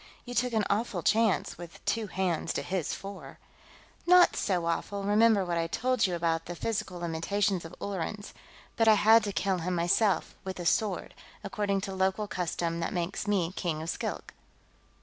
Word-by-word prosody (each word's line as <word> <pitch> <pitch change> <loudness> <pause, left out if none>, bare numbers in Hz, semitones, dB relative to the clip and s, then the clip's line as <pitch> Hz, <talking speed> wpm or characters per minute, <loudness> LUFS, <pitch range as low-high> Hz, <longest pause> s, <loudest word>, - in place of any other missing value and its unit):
"You 245 - -6
took 245 +1 +1
an 215 -2 +2
awful 200 -4 -1
chance, 220 -6 +2
with 170 -1 -11
two 225 -2 0
hands 185 -4 -1
to - - -2
his 185 -4 -2
four." 200 0 -9 0.7
"Not 360 0 +7
so 180 -4 0
awful, 200 +4 -2
remember 210 0 +4
what 170 -1 -1
I 165 - 0
told 250 +4 +1
you 180 - -2
about 165 -1 0
the 175 - -5
physical 190 -1 -3
limitations 175 +3 -1
of 165 - -9
Ullerans. 200 +2 -4 0.4
But 225 -2 +3
I 220 - +8
had 220 +2 +6
to 205 - -2
kill 190 -1 0
him 180 +2 -2
myself, 185 +4 +2
with 190 -1 -6
a 175 - -5
sword; 205 +3 0 0.3
according 200 -2 -1
to 195 0 -5
local 190 +2 0
custom 170 -3 -2
that - - -2
makes 180 +3 -3
me 185 -5 +1
King 165 -4 -2
of 165 - -2
Skilk." - - -5
190 Hz, 180 wpm, -29 LUFS, 175-210 Hz, 0.7 s, I